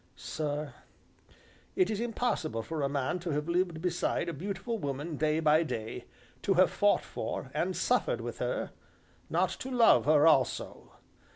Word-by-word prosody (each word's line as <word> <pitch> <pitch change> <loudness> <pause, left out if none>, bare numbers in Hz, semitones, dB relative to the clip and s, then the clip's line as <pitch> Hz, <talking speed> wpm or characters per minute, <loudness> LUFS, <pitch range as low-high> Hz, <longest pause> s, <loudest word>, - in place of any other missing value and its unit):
Sir, 150 -2 -4 1.0
it 185 +3 +2
is 210 - -2
impossible 225 - -1
for 160 +4 -4
a 140 - +1
man 140 +5 -1
to 175 0 -5
have 150 +2 -2
lived 170 -1 0
beside 175 -1 0
a - - -4
beautiful 195 - -4
woman 145 +1 -4
day 155 +1 +1
by 155 0 +4
day, 115 -6 -4 0.4
to 195 - +1
have 185 +1 +5
fought 205 0 +3
for - - -5
and - - -1
suffered - - +1
with - - -6
her, - - -2 0.6
not - - +2
to 260 - -6
love 240 -3 +5
her 150 0 +5
also. 135 -5 +1
165 Hz, 160 wpm, -30 LUFS, 150-190 Hz, 1.0 s, have